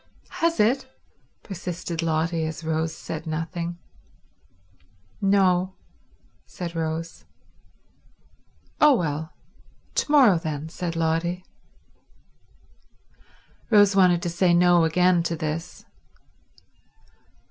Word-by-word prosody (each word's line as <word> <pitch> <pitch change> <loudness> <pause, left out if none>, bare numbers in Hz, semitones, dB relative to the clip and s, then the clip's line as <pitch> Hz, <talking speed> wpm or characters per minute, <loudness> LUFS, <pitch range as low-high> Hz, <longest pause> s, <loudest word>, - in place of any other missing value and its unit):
"Has 335 0 +1
it?" 250 +5 +2 0.6
persisted 175 -3 -5
Lotty, 165 0 0
as 160 +1 -7
Rose 160 0 -1
said 160 0 -7
nothing. 170 +2 -4 1.4
"No," 190 -2 +2 0.7
said 175 -2 -7
Rose. 165 0 -4 1.6
"Oh, 300 -2 +6
well—to 160 - -5
morrow 250 - +6
then," 155 -1 -5
said 170 0 -5
Lotty. 165 +2 -1 2.2
Rose 205 -3 +5
wanted 180 -3 +4
to 175 - -1
say 175 0 +2
No 175 -1 +5
again 180 +2 +3
to 170 0 -2
this. 160 +2 -5
170 Hz, 85 wpm, -24 LUFS, 160-185 Hz, 2.2 s, Oh